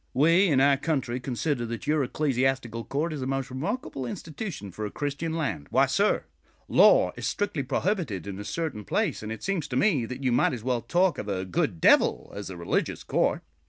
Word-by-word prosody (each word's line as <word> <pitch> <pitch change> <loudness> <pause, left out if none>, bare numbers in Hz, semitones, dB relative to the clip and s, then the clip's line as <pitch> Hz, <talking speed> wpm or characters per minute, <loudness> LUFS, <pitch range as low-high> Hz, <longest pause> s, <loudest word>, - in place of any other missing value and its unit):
We 165 +8 +5
in 145 -6 +3
our 140 0 +5
country 135 -5 -1
consider 125 +1 -2
that 115 0 -5
your 150 -1 +2
Ecclesiastical 130 -4 0
Court 155 +4 -1
is 145 - -5
a 130 - -2
most 135 -1 -2
remarkable 145 - -3
institution 155 - -6
for 110 - -6
a 105 - -2
Christian 145 +6 -3
land. 80 - -2
Why - - +4
sir, - - +1 0.4
law - - +6
is - - -3
strictly 205 -8 -1
prohibited 135 - -1
in 100 -1 -6
a - - -5
certain 150 -4 -3
place; - - -1
and 110 0 -5
it 110 - -6
seems 190 -6 -1
to 130 - -5
me 135 - +2
that 130 +3 -7
you 130 - +2
might 120 - +3
as 115 -3 -5
well 125 -1 0
talk 175 +10 +1
of 105 - -5
a 95 -1 -2
good 120 - -1
devil - - +4
as 100 -1 -6
a 95 - -7
religious 85 0 -1
court. - - 0
135 Hz, 205 wpm, -27 LUFS, 115-155 Hz, 0.4 s, law